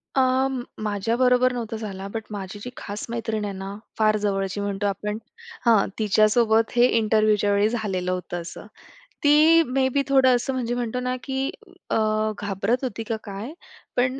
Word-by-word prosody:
अ, 260 0 +3 0.4
माझ्याबरोबर 240 +5 +2
नव्हता 230 -2 -4
झाला, 195 -3 -6
बट 225 -1 -3
माझी 200 0 -6
जी 250 - -5
खास 205 +1 -6
मैत्रीण 225 -2 -2
आहे 200 - -4
ना, 195 +1 -6 0.2
फार 215 -1 +3
जवळची 195 -1 -1
म्हणतो 200 0 -1
आपण 210 +2 -3 0.5
हां, 225 -4 +5
तिच्यासोबत 220 +2 +3
हे 240 0 +6
इंटरव्ह्यूच्या 215 -2 +3
वेळी 205 +1 +3
झालेलं 195 -6 -2
होतं 180 -1 -4
असं. 170 +3 -9 0.6
ती 310 +3 +6
मे 260 +1 +1
बी 280 - +3
थोडं 265 -2 +5
असं 245 +2 -1
म्हणजे 240 -2 -2
म्हणतो 245 0 -2
ना 250 0 -1
की 270 0 -2 0.4
अ, - - +1 0.5
घाबरत 205 +5 -1
होती 230 -3 -3
का 225 +1 -2
काय? 205 +7 -7 0.4
पण 255 +2 +1
220 Hz, 160 wpm, -24 LUFS, 205-250 Hz, 0.6 s, हे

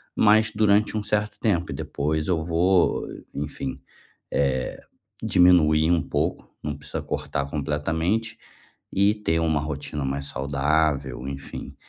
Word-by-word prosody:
mas 110 +1 +5
durante 105 0 +3
um 105 - -2
certo 105 0 -1
tempo 90 -6 0
e - - -4
depois 75 +3 -2
eu 85 -4 +1
vou, 85 +2 +2 0.3
enfim, 70 -2 -4 0.5
eh, 65 -2 0 0.4
diminuir 80 -3 +5
um 85 -3 +3
pouco, - - -2
não 75 -1 -3
precisa 70 - -5
cortar 70 -1 -3
completamente 80 +10 -1 0.6
e 100 +2 +4
ter 80 -6 0
uma 80 -2 +1
rotina 75 -1 -4
mais 70 +1 -2
saudável, 70 -1 0
enfim. 70 0 -7
80 Hz, 125 wpm, -25 LUFS, 70-95 Hz, 0.6 s, mas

